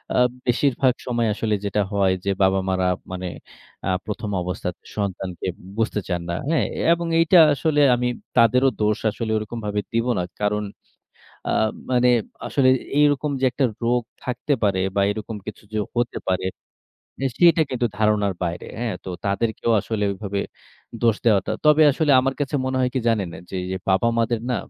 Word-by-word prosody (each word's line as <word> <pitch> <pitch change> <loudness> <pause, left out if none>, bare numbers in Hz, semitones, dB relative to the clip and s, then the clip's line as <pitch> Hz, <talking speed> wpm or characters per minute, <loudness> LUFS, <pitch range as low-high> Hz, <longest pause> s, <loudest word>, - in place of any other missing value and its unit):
আ - - +4 0.3
বেশিরভাগ 130 +1 +2
সময় 120 -2 +1
আসলে 110 0 -1
যেটা 100 +1 0
হয় 95 -2 +3
যে। - - 0
বাবা-মারা 95 -1 +1 0.3
মানে 90 0 -4 0.6
আ - - +1 0.2
১ম 105 0 -4
অবস্থায় 90 0 -3 0.2
সন্তানকে 95 -4 -3 0.3
বুঝতে 110 -2 0
চান 90 -2 -1
না। - - -1 0.2
হ্যাঁ? 165 - +2 0.3
এবং 170 0 -3
এইটা 165 +2 +5 0.2
আসলে 150 +2 +1
আমি 125 0 -1 0.3
তাদেরও 125 +3 +5
দোষ 105 0 +2
আসলে 110 +1 -4
ওরকমভাবে 105 -1 -3
দিব 115 +1 +1
না। 90 - 0 0.2
কারণ 105 0 +1 0.9
আ - - +1 0.4
মানে 125 -1 +4 0.4
আসলে 135 -2 +2
এ - - -12
এইরকম 145 0 +3
যে, - - +1
একটা 130 +3 0 0.2
রোগ 120 +1 +2 0.2
থাকতে 125 +3 -2
পারে 100 -3 +2 0.2
বা, - - +3
এরকম 110 +1 -5
কিছু 110 - -8
যে, 110 - -1 0.2
হতে 120 0 0
পারে, 95 0 0 0.8
এ - - +1
সেটা 170 -2 +5
কিন্তু 125 -2 -1
ধারণার 105 -2 +2
বাইরে। 85 0 -3
হ্যাঁ? 115 -5 -2
তো - - -5 0.2
তাদেরকেও 110 +3 0
আসলে 110 0 -2
ঐভাবে 100 0 -4 0.6
দোষ 115 -3 +4
দেওয়াটা 105 -5 +3
তবে 150 +1 +6
আসলে 150 +1 +1
আমার 135 +1 0
কাছে 145 0 -1
মনে 130 0 -1
হয় 125 -1 +2
কি - - +2
জানেন? 110 -5 +1
না - - -8
যে, - - -4 0.3
বাবা-মাদের 115 +4 +2
না 125 - +1
115 Hz, 165 wpm, -23 LUFS, 100-125 Hz, 0.9 s, তবে